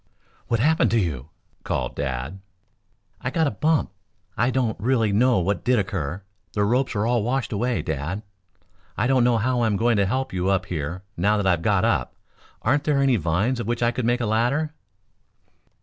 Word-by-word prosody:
"What 115 - +1
happened 155 +6 +3
to 115 - +2
you?" 75 - -3 0.3
called - - -2
Dad. 65 +6 -4 0.8
"I 125 - -2
got 160 +4 +1
a 140 - +1
bump. 155 - +1 0.4
I 120 +2 +2
don't 125 -4 0
really 115 -2 +1
know 125 +3 +4
what 95 +1 0
did 125 0 +3
occur. 95 -3 -2 0.3
The 105 - +1
ropes 125 +4 +1
are 105 +1 +1
all 120 0 +2
washed 125 +4 -1
away, 120 +4 0
Dad. 80 +6 -3 0.7
I 110 - +1
don't 130 -1 +3
know 120 -1 +3
how 125 +3 +1
I'm 110 -3 +2
going 115 0 +2
to 100 -1 +2
help 130 +3 -2
you 90 +1 0
up 95 0 +1
here 85 +2 -4
now 105 +5 +2
that 105 - -1
I 95 - +4
have 85 -2 0
got - - +2
up. - - 0 0.5
Aren't 145 +5 +1
there 150 -2 +2
any 135 -3 +3
vines 100 +9 0
of 120 - -4
which 120 0 -1
I 120 - +3
could 125 -1 -3
make 120 +1 +1
a - - 0
ladder?" 125 +9 +1
115 Hz, 195 wpm, -24 LUFS, 95-125 Hz, 0.8 s, know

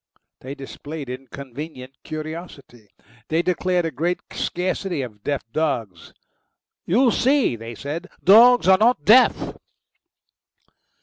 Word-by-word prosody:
They 135 +2 -8
displayed 140 0 -8
inconvenient 135 +1 -9
curiosity; 155 - -8 0.4
they 160 +2 0
declared 180 -1 0
a 165 - -2
great 170 +6 -1
scarcity 180 -3 -2
of 105 -4 -10
deaf 140 -3 -2
dogs. 115 - -2 0.8
"You 240 +7 +3
see," 265 - +2
they 115 +1 -9
said, 155 - -6 0.2
"dogs 235 +4 +7
aren't 190 -1 +4
deaf." 245 +7 +5
155 Hz, 105 wpm, -22 LUFS, 130-185 Hz, 0.8 s, dogs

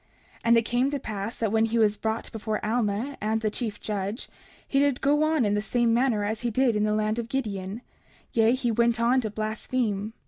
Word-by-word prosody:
30:30 - - -28
And 235 0 +6
it 230 - +2
came 245 +4 +1
to 285 -1 -2
pass 215 -2 -5
that 225 -3 -1
when 220 0 +3
he 225 +1 -1
was 215 -2 +3
brought 220 +2 -3
before 215 -1 -3
Alma 225 +4 -1
and 220 +2 0
the 215 -1 0
chief 220 -2 -3
judge, 205 +2 -4 0.4
he 275 - +1
did 280 -2 +2
go 290 +2 +2
on 310 -5 +2
in 205 - +1
the 210 - +1
same 235 +1 +1
manner 235 -3 +2
as 215 +2 -2
he 240 - 0
did 240 0 +2
in 210 0 +2
the 210 0 +1
land 215 +1 0
of 235 -1 -5
Gideon; 210 -4 -3 0.5
yea, 225 0 +4
he 250 -3 0
went 235 +1 +2
on 245 +3 +3
to 220 - -3
blaspheme. 215 0 -2
225 Hz, 230 wpm, -26 LUFS, 215-245 Hz, 0.5 s, And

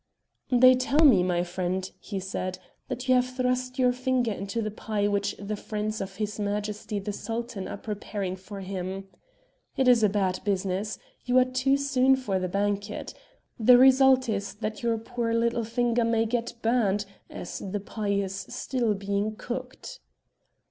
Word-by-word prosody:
"They 255 +1 +7
tell 275 +5 +3
me, 240 -11 +7
my 175 -1 +1
friend," 185 +1 -2
he 200 -2 -5
said, 185 -1 -4 0.3
"that 255 0 -5
you 255 - +5
have 255 0 +1
thrust 255 0 0
your 250 -1 +3
finger 250 -2 0
into 200 +2 -4
the 215 -1 -2
pie 210 -1 -1
which 200 0 0
the 205 +1 -4
friends 215 +1 -3
of 190 0 -6
his 210 +1 -3
Majesty 210 +1 -2
the 205 +1 -3
Sultan 225 -1 -4
are - - -5
preparing 205 -2 -4
for 195 +2 -9
him. 190 0 -5 0.7
It 265 - +2
is 245 -2 +6
a 210 - +4
bad 190 -2 0
business. 195 +1 -1 0.3
You 250 0 +2
are 255 - +6
too 255 +2 +1
soon 270 -1 +3
for 210 -8 -1
the 185 0 -2
banquet. 205 +2 -2 0.5
The 245 +2 +7
result 265 0 +6
is 200 -2 -2
that 215 0 -4
your 230 -1 +1
poor 230 0 -2
little 235 0 +1
finger 235 +1 +1
may 230 0 +2
get 235 +1 -2
burnt, 215 -4 +2 0.2
as 175 - -6
the 200 +1 -4
pie 210 +1 -5
is 200 -1 0 0.2
still 235 -5 -1
being 200 +2 -2
cooked." 250 +3 -7
215 Hz, 170 wpm, -27 LUFS, 200-250 Hz, 0.7 s, They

